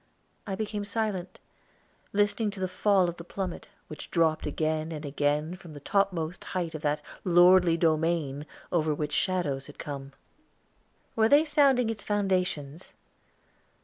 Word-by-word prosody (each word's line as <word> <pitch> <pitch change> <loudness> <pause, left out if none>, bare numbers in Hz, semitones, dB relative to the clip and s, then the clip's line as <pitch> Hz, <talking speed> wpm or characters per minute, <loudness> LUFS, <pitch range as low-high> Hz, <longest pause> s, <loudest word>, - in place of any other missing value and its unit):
I 195 - -2
became 210 0 -3
silent, 205 -3 -3 0.7
listening 205 +2 +1
to 200 -1 -8
the 185 - 0
fall 185 0 +2
of 175 0 -4
the 170 - -8
plummet, 185 0 -5 0.2
which 155 - -9
dropped 160 -3 +1
again 155 +1 -1
and 155 -1 -6
again 145 +3 0
from 175 -4 -12
the 145 - -9
topmost 175 -1 0
height 175 -3 -3
of 155 - -6
that 150 0 0 0.2
lordly 175 -1 +6
domain, 155 -3 0 0.2
over 155 -3 +1
which 150 0 -3
shadows 160 -8 0
had 145 - -13
come. 140 -1 -7 1.0
Were 220 0 +4
they 295 +2 +6
sounding 275 -6 +3
its 215 -2 -7
foundations? 185 -6 -1
175 Hz, 145 wpm, -28 LUFS, 155-200 Hz, 1.0 s, lordly